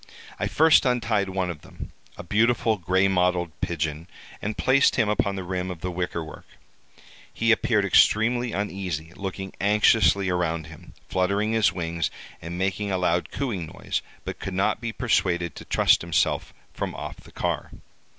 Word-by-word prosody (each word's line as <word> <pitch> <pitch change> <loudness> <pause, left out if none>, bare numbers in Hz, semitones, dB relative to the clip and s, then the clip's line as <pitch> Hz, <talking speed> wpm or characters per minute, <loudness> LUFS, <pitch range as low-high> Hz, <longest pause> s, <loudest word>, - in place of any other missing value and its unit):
I - - 0
first 160 0 +5
untied 115 -6 +1
one 95 -1 -1
of 75 -3 -10
them, - - -10 0.3
a - - -7
beautiful 110 +3 +2
gray 95 +3 +2
mottled 90 -2 +1
pigeon, 80 0 -2 0.3
and 105 +1 -3
placed 135 +2 +4
him 110 -4 +2
upon 100 -1 0
the 95 - -4
rim 90 0 -3
of 90 -3 -7
the 90 - -3
wicker 90 -1 -3
work. 80 - -11 0.8
He 115 0 +1
appeared 110 -3 +2
extremely 120 +4 +3
uneasy, 90 -6 -4
looking 95 -1 -5
anxiously 105 -1 +4
around 85 -3 -1
him, 80 -1 -14
fluttering 100 +4 0
his 110 -5 +3
wings, 85 -2 -2 0.3
and 85 +1 -6
making 95 +2 -1
a 95 - +1
loud 90 -1 0
cooing 105 - -3
noise, - - -3 0.2
but - - -5
could 95 - -5
not 95 +3 +1
be 115 -1 -3
persuaded 85 -5 0
to - - -9
trust - - +3
himself 85 -2 0 0.2
from - - -4
off - - -6
the - - -16
car. - - -2
95 Hz, 165 wpm, -25 LUFS, 85-105 Hz, 0.8 s, first